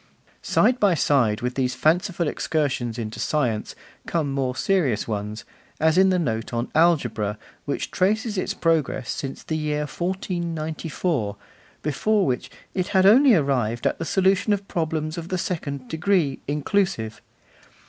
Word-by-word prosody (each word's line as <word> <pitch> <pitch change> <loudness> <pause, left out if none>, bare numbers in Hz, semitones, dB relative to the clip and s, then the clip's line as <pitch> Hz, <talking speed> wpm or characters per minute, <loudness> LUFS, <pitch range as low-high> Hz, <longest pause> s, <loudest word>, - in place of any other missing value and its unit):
Side 250 0 +2
by 200 -4 +4
side 125 -8 +2
with 125 +1 -2
these 130 -1 -1
fanciful 170 +5 +1
excursions 130 -8 -1
into 110 -2 -5
science, 125 -8 -1 0.3
come 155 -5 0
more 130 -2 -1
serious 145 - +1
ones, 105 0 -4 0.3
as 160 0 +3
in 190 +1 +5
the 185 - +2
note 115 -10 -2
on 120 0 -2
Algebra, 120 -11 +2 0.3
which - - -3
traces 215 +4 +1
its 185 - -2
progress 160 -6 0
since 135 -1 -5
the 160 - -3
year 150 -1 -1
1494, 165 - -2 0.5
before 200 +8 +1
which 125 -2 -1 0.2
'it 185 -1 -1
had 190 -2 +3
only 245 +4 +7
arrived 125 - 0
at - - +1
the - - -2
solution 190 +3 +2
of 200 -1 -3
problems 160 -1 -2
of 165 - -7
the 185 - -2
second 140 -7 -4
degree, 160 -3 +1
inclusive. 145 - -1
155 Hz, 145 wpm, -24 LUFS, 125-185 Hz, 0.5 s, only